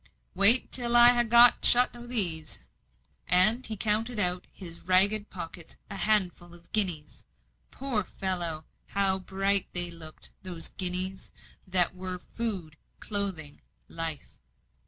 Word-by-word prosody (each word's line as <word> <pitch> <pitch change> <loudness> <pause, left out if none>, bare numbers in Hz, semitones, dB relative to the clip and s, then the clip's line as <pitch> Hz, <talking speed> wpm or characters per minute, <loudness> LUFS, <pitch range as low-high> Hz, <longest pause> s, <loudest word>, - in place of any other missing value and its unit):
"Wait 200 +7 +6
till 240 -1 +2
I 240 0 +9
ha' 240 -2 -1
got 235 +1 +5
shut 245 0 +4
o' 240 0 -12
these." 175 -10 +3 0.7
And 215 +8 +2
he 220 - -6
counted 220 +3 -2
out 180 -2 0
of - - -37
his 170 -3 -9
ragged 200 +3 0
pockets 170 -2 -10 0.2
a - - -8
handful 185 -4 -3
of 170 0 -22
guineas. 180 -8 -1 0.5
Poor 255 -6 -5
fellow! 175 -5 -5 0.2
how 195 -1 0
bright 195 +1 -2
they 175 -1 0
looked; 160 -2 -11
those 175 -3 -7
guineas, 185 0 -3 0.4
that 180 -2 +3
were 185 0 -7 0.2
food, 190 -10 -6 0.2
clothing, 195 -8 -4 0.3
life. 165 -3 -5
190 Hz, 135 wpm, -25 LUFS, 175-215 Hz, 0.7 s, I